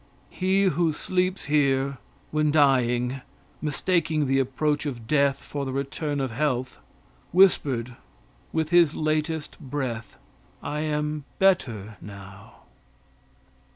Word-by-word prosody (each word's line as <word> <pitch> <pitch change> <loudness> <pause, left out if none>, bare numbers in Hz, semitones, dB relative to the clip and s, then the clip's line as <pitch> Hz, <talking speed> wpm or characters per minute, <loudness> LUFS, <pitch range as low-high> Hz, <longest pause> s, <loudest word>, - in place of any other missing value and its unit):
He 190 +1 +1
who 170 -3 +2
sleeps 185 +4 -1
here, 140 -2 +1 0.3
when 155 0 +2
dying, 130 -3 +2 0.4
mistaking 155 0 0
the 135 0 +2
approach 145 +3 0
of 120 -5 -5
death 140 +1 +2
for 145 -1 -5
the 135 - -3
return 140 +2 -2
of 135 -3 -1
health, 130 - -1 0.5
whispered 135 -10 +3 0.6
with 160 -1 -1
his 170 -3 +5
latest 155 0 -1
breath, 130 -4 -4 0.5
"I 150 - -3
am 150 -1 -2
better 115 - +1
now." 100 +2 -12
145 Hz, 110 wpm, -25 LUFS, 130-155 Hz, 0.6 s, his